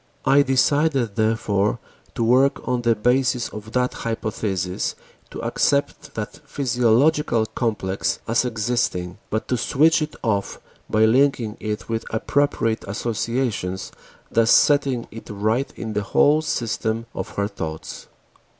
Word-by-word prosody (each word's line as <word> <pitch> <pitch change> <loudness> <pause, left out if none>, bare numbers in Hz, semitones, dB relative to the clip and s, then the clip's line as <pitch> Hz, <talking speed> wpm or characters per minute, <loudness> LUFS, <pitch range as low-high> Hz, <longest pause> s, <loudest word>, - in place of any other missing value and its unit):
I 135 +2 +6
decided 135 -3 +2
therefore 110 -1 +1 0.4
to 115 - 0
work 130 +4 +3
on 125 -1 0
the 115 -1 +2
basis 125 +2 +1
of 105 +1 -9
that 125 0 +1
hypothesis, 100 -5 -2 0.3
to - - -7
accept 145 +1 0
that 105 -1 -5
physiological 125 -1 +2
complex 105 -5 -1
as 115 +2 +2
existing, 110 -6 -1
but 110 - -2
to 125 - +1
switch 155 +7 +3
it 155 0 -3
off 100 -4 -1 0.3
by 110 +1 +4
linking 120 -2 +2
it 105 -2 -4
with 115 0 -4
appropriate 115 -1 0
associations, 105 -3 -2 0.4
thus 115 0 +3
setting 140 -4 +4
it 115 - -10
right 110 +6 0
in 110 -2 -5
the 105 - 0
whole 145 +9 +3
system 115 -5 -2
of 95 +3 -6
her 100 0 0
thoughts. 80 -6 -7
115 Hz, 130 wpm, -22 LUFS, 105-130 Hz, 0.4 s, I